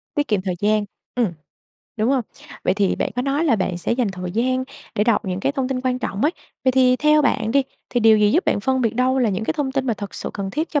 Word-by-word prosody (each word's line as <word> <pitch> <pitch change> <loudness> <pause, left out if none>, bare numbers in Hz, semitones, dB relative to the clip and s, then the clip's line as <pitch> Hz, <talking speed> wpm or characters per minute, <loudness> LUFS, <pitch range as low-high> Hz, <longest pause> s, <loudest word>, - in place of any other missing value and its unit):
Tiết 290 -1 0
kiệm 210 -3 +1
thời 185 -1 -2
gian, 210 0 +2 0.3
ừm. 235 -7 +1 0.6
Đúng 220 +3 +1
hông? 270 -2 +2 0.4
Vậy - - +2
thì 200 -2 +1
bạn - - -1
có 250 - +1
nói 280 +4 0
là 270 -8 +3
bạn 185 -3 -1
sẽ 175 - -1
dành 240 -2 +1
thời 180 -1 -5
gian 255 +4 0 0.3
để 210 - +1
đọc 230 -2 +2
những 185 -1 -3
cái 275 - 0
thông 270 -3 -1
tin 260 -1 -2
quan 255 -1 0
trọng 200 -5 -3
ấy, 300 - +3 0.3
vậy 260 - +4
thì 255 -1 +4
theo 300 +2 +4
bạn 225 -5 +1
đi, 275 +1 +4 0.3
thì 245 - +1
điều 220 -1 +6
gì 210 0 +4
giúp 340 +7 +2
bạn - - +1
phân 260 +4 +1
biệt 230 -3 0
đâu 255 +2 +2
là 240 -4 +2
những 195 +3 -2
cái - - 0
thông 290 -4 -2
tin 270 -1 -1
mà 235 - +1
thật 205 -1 -7
sự - - -3
cần 195 -1 -4
thiết 310 - -2
cho 295 - +1
245 Hz, 285 wpm, -21 LUFS, 210-265 Hz, 0.6 s, điều